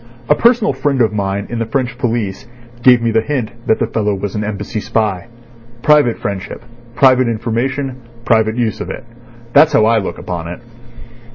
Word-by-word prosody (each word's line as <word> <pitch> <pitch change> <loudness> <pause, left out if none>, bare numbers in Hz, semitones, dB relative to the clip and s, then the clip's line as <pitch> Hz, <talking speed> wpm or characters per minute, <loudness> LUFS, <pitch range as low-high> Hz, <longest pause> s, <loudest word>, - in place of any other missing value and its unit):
A - - +5
personal 230 +5 +3
friend 140 -3 -1
of 110 -3 +2
mine 100 -1 -2
in 120 - -3
the 115 - -1
French 125 0 -2
police 115 -6 -2 0.3
gave 125 -1 +5
me 115 - +1
the 110 0 +2
hint 125 -4 -3 0.2
that 110 - +3
the - - 0
fellow 105 -2 -1
was 100 0 -4
an 105 - -2
Embassy 105 +1 -4
spy. 105 -3 -1 0.6
Private 150 -6 +4
friendship, 100 +2 -5 0.3
private 130 -2 +4
information, 125 +4 -2 0.3
private 110 -1 +2
use 115 -3 -1
of - - -5
it—that's 120 +5 0
how 110 - +4
I 115 0 +3
look 95 - -5
upon 85 -2 -5
it." 85 - -7
115 Hz, 175 wpm, -16 LUFS, 105-125 Hz, 0.6 s, A